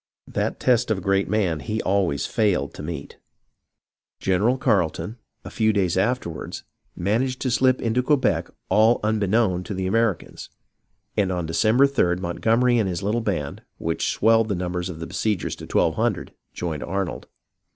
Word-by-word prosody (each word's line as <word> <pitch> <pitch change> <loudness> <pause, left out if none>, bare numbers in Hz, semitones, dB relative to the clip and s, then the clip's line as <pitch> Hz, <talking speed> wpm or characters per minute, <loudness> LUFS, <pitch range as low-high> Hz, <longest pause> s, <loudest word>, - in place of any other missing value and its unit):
That - - -2
test 120 -2 +2
of 110 - +1
a - - -5
great 95 0 +1
man 95 -7 +1
he 105 +10 -3
always 95 -7 +1
failed 100 - 0
to - - -8
meet. 75 -2 -7 1.0
General 100 +7 +2
Carleton, 110 -2 0 0.3
a - - -7
few 110 -1 +2
days 95 -4 +1
afterward, 95 -4 -1 0.4
managed 120 +8 0
to 130 - 0
slip 130 +2 +3
into 120 +2 +1
Quebec 135 +1 +1 0.2
all 110 +3 +4
unbeknown 105 -3 +1
to 105 - -4
the 95 0 -2
Americans, 115 -1 -1 0.7
and 95 -3 +1
on 90 -2 -2
December 110 +11 +3
3d 90 -11 +1
Montgomery 115 +7 +2
and 100 -4 +1
his 90 +2 -3
little 110 +4 0
band, 85 -10 -3 0.2
which 80 0 -1
swelled 115 0 +3
the 100 - 0
numbers 90 0 -3
of 80 -3 -7
the 80 - -4
besiegers 105 -1 -2
to - - -9
twelve - - +2
hundred, - - -1 0.2
joined 80 -4 -4
Arnold. 95 0 -3
100 Hz, 160 wpm, -23 LUFS, 90-115 Hz, 1.0 s, all